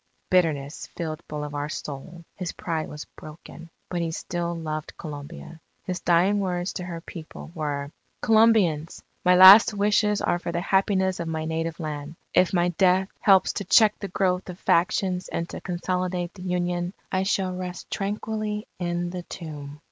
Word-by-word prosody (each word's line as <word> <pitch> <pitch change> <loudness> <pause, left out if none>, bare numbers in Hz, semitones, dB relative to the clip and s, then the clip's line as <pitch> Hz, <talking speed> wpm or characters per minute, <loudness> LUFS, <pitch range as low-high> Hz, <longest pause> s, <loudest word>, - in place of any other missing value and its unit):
Bitterness 155 -6 +1
filled 160 -2 -4
Bolivar's 150 0 -4
soul, 165 +4 -8
his 180 -3 -5
pride 160 -2 -3
was 150 0 -8
broken, 165 +2 -12 0.2
but 175 -1 -2
he 165 - -1
still 170 +1 -3
loved 155 -2 -5
Colombia. 155 +2 -8 0.2
His 180 -1 -3
dying 180 +4 +3
words 180 -1 -2
to 180 - -5
her 170 -2 -6
people, 160 -1 -10
were: 145 -3 -3 0.3
_Colombians! 215 -8 +3 0.2
My 180 0 +5
last 195 +4 +10
wishes 210 0 +2
are 175 - 0
for 175 - -4
the 170 - -1
happiness 190 0 +1
of 170 - -3
my 160 -1 -3
native 160 +1 -3
Land. 150 -1 -5 0.2
If 180 0 +4
my 175 -1 +2
death 185 +2 +3
helps 190 -2 +4
to - - -3
check 215 +2 +5
the 200 - -4
growth 185 0 0
of 180 - -7
factions 180 +1 +1
and 170 - -3
to - - -7
consolidate 180 0 -2
the 190 - -12
Union, 180 0 -2 0.2
I 185 - +1
shall 190 -1 0
rest 180 -1 -6
tranquilly 210 +1 -3
in 175 0 -2
the 180 0 -5
tomb. 150 -4 -8
175 Hz, 165 wpm, -25 LUFS, 160-190 Hz, 0.3 s, last